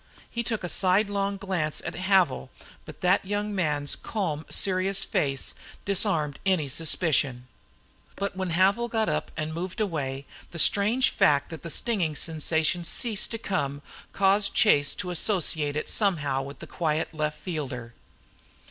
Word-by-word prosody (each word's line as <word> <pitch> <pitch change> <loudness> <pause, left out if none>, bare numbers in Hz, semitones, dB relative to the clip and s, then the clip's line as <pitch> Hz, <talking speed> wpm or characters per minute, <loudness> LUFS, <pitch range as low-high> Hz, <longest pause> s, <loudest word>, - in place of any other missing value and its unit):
He 235 - -2
took 225 -3 -3
a - - -1
sidelong 200 +2 +1
glance 185 -6 -1
at - - -3
Havil, 185 -6 +2 0.4
but 155 - -11
that 180 +2 +3
young 205 +1 -2
man's 150 -6 0
calm, 160 -8 -3
serious 190 0 +1
face 135 -2 -1 0.3
disarmed 180 -7 0
any 180 -7 +1
suspicion. 145 -4 0 0.7
But 200 -1 -3
when 185 -1 -2
Havil 195 +7 +3
got 220 -1 +1
up - - -1
and 155 0 -2
moved 180 +6 -5
away 140 -9 -2 0.2
the 170 - -8
strange 205 - +4
fact 145 -8 +3
that 160 - -7
the 170 - -6
stinging 180 -5 0
sensation 160 +2 0
ceased 215 +4 0
to 225 - -3
come 145 -10 -2 0.3
caused 200 +1 +2
Chase 145 -9 +4
to 180 - -4
associate 160 -5 +1
it 150 - -2
somehow 145 -10 +1
with 140 0 -8
the - - -9
quiet 160 -1 -1
left 150 -1 -2
fielder. 130 -9 -5
175 Hz, 150 wpm, -27 LUFS, 150-200 Hz, 0.7 s, strange